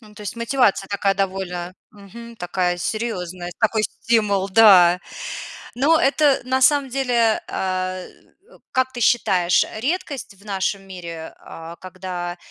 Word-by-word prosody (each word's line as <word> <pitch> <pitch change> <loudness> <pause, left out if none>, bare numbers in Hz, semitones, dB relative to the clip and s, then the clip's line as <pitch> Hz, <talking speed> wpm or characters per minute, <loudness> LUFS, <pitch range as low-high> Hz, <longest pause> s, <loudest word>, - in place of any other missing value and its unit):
Ну, 210 -2 -17
то 210 - -11
есть 205 - -6
мотивация 235 -5 +1
такая 200 -1 +1
довольно, 185 -2 -3 0.2
мгм, 230 +3 -12
такая 180 -1 -1
серьёзная, 180 -3 -3
такой 220 -1 +2
стимул, 210 -4 0
да. 190 -4 +7 0.8
Ну 290 +6 +4
это 280 -1 +3
на 260 +1 0
самом 280 +1 +4
деле, 245 -4 +1
а, 185 0 -2 0.5
э, - - -18
как 260 0 0
ты 240 - -6
считаешь, 185 -7 +3
э, - - -8
редкость 285 - -3
в 200 +2 -21
нашем 195 -1 -2
мире, 170 -3 -8
а, 165 +1 -10
когда, 180 -1 -6
200 Hz, 140 wpm, -21 LUFS, 185-235 Hz, 0.8 s, да